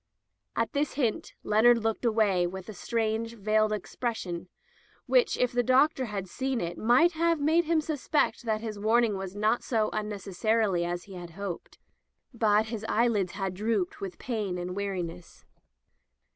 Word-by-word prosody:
At -, -, -1 dB
this 290 Hz, -1 st, 0 dB
hint, 245 Hz, -7 st, -1 dB
Leonard 225 Hz, +3 st, +5 dB
looked 225 Hz, +1 st, -2 dB
away 210 Hz, -6 st, +3 dB
with 190 Hz, +1 st, -7 dB
a -, -, -6 dB
strange, 225 Hz, +3 st, -2 dB
veiled 215 Hz, 0 st, +2 dB
expression, 200 Hz, -4 st, -4 dB, 0.6 s
which -, -, +3 dB
if 250 Hz, -, +1 dB
the 245 Hz, -, +2 dB
Doc 265 Hz, +6 st, +4 dB
tor 260 Hz, -2 st, -3 dB
had 200 Hz, -3 st, -4 dB
seen 260 Hz, +6 st, -2 dB
it 170 Hz, -2 st, -3 dB
might 245 Hz, -, +4 dB
have 335 Hz, -1 st, +1 dB
made 320 Hz, +4 st, +3 dB
him 320 Hz, 0 st, +2 dB
suspect 305 Hz, -1 st, 0 dB
that 220 Hz, -3 st, -1 dB
his 215 Hz, -2 st, -5 dB
warning 220 Hz, 0 st, +3 dB
was 190 Hz, 0 st, -6 dB
not 215 Hz, +3 st, +1 dB
so 220 Hz, -3 st, 0 dB
unnecessary 210 Hz, -1 st, 0 dB
as 175 Hz, +1 st, -3 dB
he 195 Hz, -, -12 dB
had 175 Hz, -1 st, -8 dB
hoped; 200 Hz, -4 st, -6 dB, 0.6 s
but 220 Hz, -2 st, +3 dB
his 220 Hz, -1 st, -5 dB
eyelids 215 Hz, -5 st, +1 dB
had 195 Hz, -2 st, -3 dB
drooped 205 Hz, -2 st, -1 dB
with 190 Hz, -3 st, -5 dB
pain 210 Hz, -7 st, -3 dB
and 180 Hz, +1 st, -4 dB
weariness. 180 Hz, -4 st, -5 dB
215 Hz, 160 wpm, -28 LUFS, 195-240 Hz, 0.6 s, Leonard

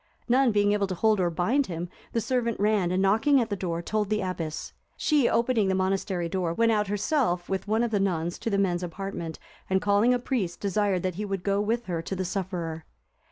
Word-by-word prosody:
None 255 Hz, 0 st, +4 dB
being 205 Hz, -1 st, +3 dB
able 205 Hz, -1 st, +1 dB
to 185 Hz, -, -3 dB
hold 215 Hz, +2 st, +2 dB
or 175 Hz, -2 st, +2 dB
bind 220 Hz, -, +1 dB
him, 175 Hz, 0 st, -4 dB, 0.2 s
the 230 Hz, -, 0 dB
servant 235 Hz, -2 st, -1 dB
ran, 205 Hz, -3 st, +2 dB
and 185 Hz, +2 st, +1 dB
knocking 225 Hz, +9 st, +4 dB
at 230 Hz, -3 st, -1 dB
the -, -, +1 dB
door, 170 Hz, -3 st, -3 dB
told 210 Hz, +1 st, -1 dB
the 215 Hz, 0 st, +1 dB
abbess. 170 Hz, -4 st, -4 dB, 0.2 s
She, 295 Hz, -6 st, +3 dB
opening 235 Hz, -3 st, +2 dB
the 190 Hz, -, +1 dB
monastery 190 Hz, -2 st, 0 dB
door, 175 Hz, -1 st, -1 dB
went 230 Hz, +2 st, +3 dB
out 210 Hz, -2 st, +1 dB
herself 205 Hz, -, 0 dB
with 190 Hz, +1 st, -3 dB
one 220 Hz, +2 st, +2 dB
of 235 Hz, -, -1 dB
the 205 Hz, -, +1 dB
nuns 175 Hz, -3 st, -1 dB
to -, -, -2 dB
the 200 Hz, -, +1 dB
men's 180 Hz, -3 st, +1 dB
apartment, 175 Hz, -2 st, -5 dB, 0.3 s
and 190 Hz, 0 st, +3 dB
calling 205 Hz, +4 st, +3 dB
a 250 Hz, -, +3 dB
priest, 225 Hz, -9 st, -2 dB
desired 200 Hz, -2 st, 0 dB
that 185 Hz, -2 st, -1 dB
he -, -, -1 dB
would 195 Hz, -3 st, -3 dB
go 200 Hz, 0 st, +1 dB
with 230 Hz, +3 st, -1 dB
her 170 Hz, -3 st, -2 dB
to 190 Hz, -, -4 dB
the 185 Hz, 0 st, -2 dB
sufferer. 175 Hz, -4 st, -3 dB
195 Hz, 225 wpm, -27 LUFS, 180-220 Hz, 0.3 s, None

